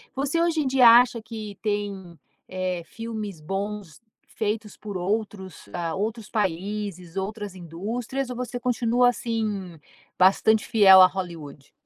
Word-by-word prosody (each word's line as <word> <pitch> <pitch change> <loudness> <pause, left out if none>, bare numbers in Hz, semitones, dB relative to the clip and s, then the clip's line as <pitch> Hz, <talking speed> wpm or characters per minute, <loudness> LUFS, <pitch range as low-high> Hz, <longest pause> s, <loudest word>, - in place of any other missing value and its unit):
Você 285 +5 0
hoje 330 -2 +1
em 275 - -1
dia 260 -2 +6
acha 240 0 +5
que 215 -2 -8
tem, 200 -5 -3 0.3
eh. 185 -2 -3
Filmes 215 -6 -7
bons 195 -1 -5 0.4
feitos 210 -1 -2
por 205 -3 -6
outros, 190 -1 -4
eh, 170 -2 -4
outros 215 +2 -3
países, 195 -2 -3
outras 205 +1 -4
indústrias 215 - -5
ou - - -5
você 245 0 -5
continua 245 0 +2
assim 215 -7 -3 0.4
bastante 200 +3 +4
fiel 195 -5 +7
a 185 - +10
Hollywood? 165 -7 -8
210 Hz, 130 wpm, -25 LUFS, 185-230 Hz, 0.4 s, a